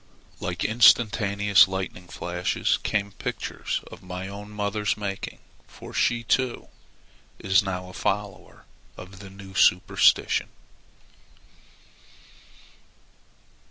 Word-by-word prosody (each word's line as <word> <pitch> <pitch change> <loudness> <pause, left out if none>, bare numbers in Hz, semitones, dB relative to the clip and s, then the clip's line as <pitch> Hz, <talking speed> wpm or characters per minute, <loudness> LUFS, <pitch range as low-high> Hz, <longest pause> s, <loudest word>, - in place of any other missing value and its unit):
Like 90 -1 -3
instantaneous 105 -4 +5
lightning 95 -1 -5
flashes 90 0 -1
came 100 -1 -1
pictures 95 - -4
of - - -11
my 90 +1 -6
own 100 +1 -8
mother's 105 0 -1
making, 100 -2 -5 0.3
for - - -12
she, 120 0 +1
too, 125 +1 0 0.7
is 95 +1 +3
now 90 -2 -4
a 90 - -12
follower 100 0 -4 0.3
of 90 +1 -11
the 100 -1 -10
new 95 0 -12
superstition. 90 -2 +3
100 Hz, 95 wpm, -25 LUFS, 95-105 Hz, 0.7 s, instantaneous